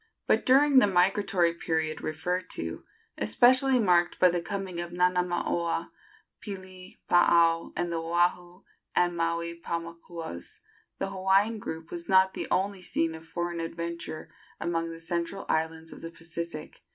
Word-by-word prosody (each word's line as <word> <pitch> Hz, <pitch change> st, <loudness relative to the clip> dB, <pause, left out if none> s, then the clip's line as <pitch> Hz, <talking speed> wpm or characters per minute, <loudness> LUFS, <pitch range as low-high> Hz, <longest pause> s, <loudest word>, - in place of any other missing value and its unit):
But -, -, +2 dB
during 275 Hz, +1 st, +6 dB
the 210 Hz, -, +4 dB
migratory 185 Hz, -2 st, +2 dB
period 160 Hz, -2 st, -2 dB
referred 180 Hz, +4 st, -2 dB
to, 80 Hz, 0 st, -6 dB, 0.3 s
especially 255 Hz, -, +4 dB
marked 175 Hz, -6 st, +3 dB
by 180 Hz, -, +6 dB
the 175 Hz, 0 st, -1 dB
coming 190 Hz, -1 st, -4 dB
of 175 Hz, -, -5 dB
Nanamaoa, 175 Hz, -1 st, 0 dB, 0.5 s
Pili, 185 Hz, -2 st, -9 dB
Paao 170 Hz, -1 st, +4 dB
and 175 Hz, 0 st, -1 dB
the 165 Hz, -, -1 dB
Oahu 175 Hz, +2 st, 0 dB, 0.3 s
and 175 Hz, 0 st, +2 dB
Maui 170 Hz, 0 st, -2 dB
Paumakuas, 170 Hz, -, -6 dB, 0.4 s
the 195 Hz, -, -3 dB
Hawaiian 195 Hz, +3 st, +2 dB
group 160 Hz, -3 st, -7 dB
was 170 Hz, -1 st, -6 dB
not 190 Hz, 0 st, +5 dB
the -, -, -4 dB
only 195 Hz, 0 st, 0 dB
scene 165 Hz, -2 st, -1 dB
of 160 Hz, 0 st, -11 dB
foreign 175 Hz, +1 st, -3 dB
adventure 170 Hz, -1 st, -5 dB, 0.3 s
among 165 Hz, 0 st, -1 dB
the 165 Hz, 0 st, -8 dB
central 170 Hz, +3 st, -3 dB
islands 160 Hz, 0 st, -1 dB
of -, -, -12 dB
the 165 Hz, -, -6 dB
Pacific. 165 Hz, -1 st, -7 dB
175 Hz, 140 wpm, -28 LUFS, 165-185 Hz, 0.5 s, during